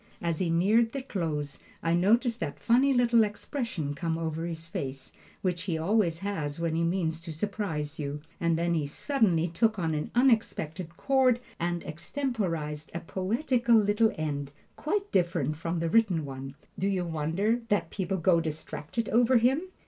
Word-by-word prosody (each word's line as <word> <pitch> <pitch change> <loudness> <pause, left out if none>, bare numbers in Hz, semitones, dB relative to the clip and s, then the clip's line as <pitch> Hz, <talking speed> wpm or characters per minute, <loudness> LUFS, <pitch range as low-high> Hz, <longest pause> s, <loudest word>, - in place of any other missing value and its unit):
As 170 -2 -1
he 180 - 0
neared 215 +7 +3
the 275 - -3
close 155 - -3 0.2
I 165 - +2
noticed 230 +7 +3
that - - -3
funny 255 +4 +4
little 240 -3 +4
expression 210 - -3
come 160 +3 -2
over 165 0 -3
his 165 -1 -5
face, 135 -4 -5 0.3
which 180 -2 -1
he 170 -5 -1
always 170 -1 +1
has 165 -7 -3
when 165 -1 0
he 165 - +1
means 165 -2 0
to 165 - -7
surprise 160 -4 -3
you, 145 0 -3 0.2
and 170 -1 +2
he 170 - 0
then 145 - -2
suddenly 180 - +1
took 215 +6 +1
an 160 -4 -1
unexpected 185 - +1
chord 260 -3 +3 0.2
and 175 0 -1
extemporized 165 - -3
a - - -1
poetical 235 - +1
little 215 +1 +4
end, 145 -3 -3 0.2
quite 400 +6 -2
different 170 -5 +1
from 165 +2 -2
the 165 0 0
written 180 -5 +3
one. 135 0 -7 0.2
Do 195 - +1
you 185 -3 0
wonder 170 +9 0
that 205 - +1
people 190 -1 -2
go 170 -1 +3
distracted 160 +6 -4
over 245 +2 +4
him? 255 +6 +3
175 Hz, 165 wpm, -29 LUFS, 160-225 Hz, 0.3 s, funny